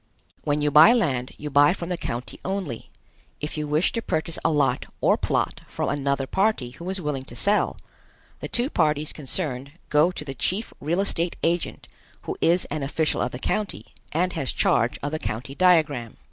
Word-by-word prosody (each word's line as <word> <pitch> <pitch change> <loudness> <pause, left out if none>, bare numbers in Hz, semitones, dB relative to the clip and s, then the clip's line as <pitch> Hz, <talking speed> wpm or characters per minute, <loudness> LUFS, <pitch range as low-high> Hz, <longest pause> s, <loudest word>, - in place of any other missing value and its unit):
When 145 0 +1
you 150 - +2
buy 155 +10 +9
land 130 - +1
you 150 0 -6
buy 145 +3 +6
from 175 -2 -6
the 180 - 0
county 120 -6 -5
only. 185 - -4 0.5
If 150 - -4
you 150 -1 -2
wish 150 +4 +2
to 230 - -2
purchase 165 -5 -1
a - - +3
lot 145 -3 +1
or - - +4
plot - - -1
from - - -2
another 140 -1 0
party 190 - 0
who 170 +7 -7
is 190 0 -2
willing 150 -5 -2
to 120 - -10
sell, 200 - +1 0.6
the - - -5
two 245 +4 0
parties 155 -2 +1
concerned 140 -2 -3 0.2
go 150 +3 +4
to 175 -5 -6
the 135 - -5
chief 190 - -1
real 170 +6 0
estate 175 -3 0
agent 170 +1 -1 0.4
who - - -4
is 175 +2 +3
an 155 - -2
official 155 +3 0
of - - 0
the - - -5
county 205 +9 -3 0.2
and 180 +3 0
has 135 - -2
charge 120 0 +2
of 145 - -2
the 155 - -2
county 110 +4 -4
diagram. 150 -9 +2
150 Hz, 190 wpm, -25 LUFS, 135-180 Hz, 0.6 s, buy